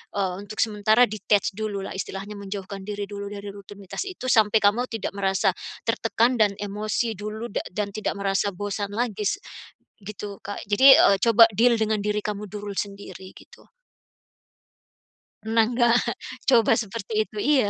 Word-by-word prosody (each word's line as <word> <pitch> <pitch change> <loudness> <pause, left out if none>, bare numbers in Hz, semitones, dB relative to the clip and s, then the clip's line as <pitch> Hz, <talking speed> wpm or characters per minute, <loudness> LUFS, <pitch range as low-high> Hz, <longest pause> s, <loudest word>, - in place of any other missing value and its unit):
eee, 190 -2 0
untuk 205 +2 -9
sementara 215 +2 +3
detach 205 -1 +1
dulu 205 -2 -3
lah 195 - -6
istilahnya 195 +2 -6
menjauhkan 195 0 -6
diri 205 -1 -4
dulu 200 0 -6
dari 205 0 -7
rutinitas 200 - -7
itu 365 -9 -6
sampai 220 -1 +4
kamu 230 +5 +3
tidak 225 -3 -3
merasa 195 -1 +1 0.4
tertekan 240 +3 +1
dan 205 -2 +3
emosi 210 +3 -2
dulu 215 +4 -6
dak - - -3
dan 205 -1 -2
tidak 215 - -2
merasa 200 +1 0
bosan 200 +1 -4
lagi, 215 -2 -1 0.6
gitu 205 0 -7
Kak. 205 - -7
Jadi, 260 +7 +7
eee, 200 - +5
coba 230 0 +7
deal 235 +3 +4
dengan 215 -1 0
diri 210 +1 -1
kamu 210 -1 -4
dulu 205 0 -6
sendiri 195 -2 -6
gitu. - - -18 1.7
Pernah 225 +1 +3
enggak? 240 0 +2 0.6
coba 235 -4 +5
seperti 220 0 -6
itu? - - -19
Iya. 265 -7 +3
205 Hz, 155 wpm, -24 LUFS, 200-220 Hz, 1.7 s, Jadi